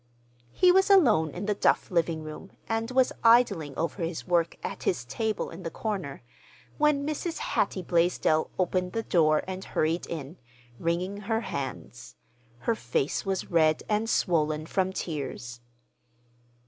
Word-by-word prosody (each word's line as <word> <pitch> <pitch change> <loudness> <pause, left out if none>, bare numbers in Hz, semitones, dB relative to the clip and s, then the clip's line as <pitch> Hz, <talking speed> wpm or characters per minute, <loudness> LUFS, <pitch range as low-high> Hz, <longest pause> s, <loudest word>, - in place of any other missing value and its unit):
He 365 - +5
was 385 +2 +4
alone 240 - +5
in 180 +6 -6
the 210 - +1
Duff 200 - +1
living 165 -2 0
room, 155 +5 -9
and 225 +1 -1
was 255 0 +2
idling 215 - +4
over 165 +3 -2
his 165 0 -3
work, 170 -2 +1
at - - -5
his 120 -10 -1
table 220 - -2
in 165 +3 -9
the 170 - -4
corner, 185 - -4 0.6
when 295 -1 +3
Mrs. 310 +3 -3
Hattie 195 -2 -1
Blaisdell 170 -2 +2
opened 180 0 0
the 225 - -1
door 155 -5 +3
and 190 0 -5
hurried 165 +3 -1
in, 160 +1 -6 0.4
wringing 180 +4 -1
her 220 +2 -1
hands. 130 - -6 0.5
Her 230 - +1
face 140 - -2
was 190 -1 -2
red 155 -2 +3
and 215 +1 0
swollen 155 -6 +1
from 190 +2 0
tears. 135 -9 -5
180 Hz, 145 wpm, -27 LUFS, 155-220 Hz, 0.6 s, He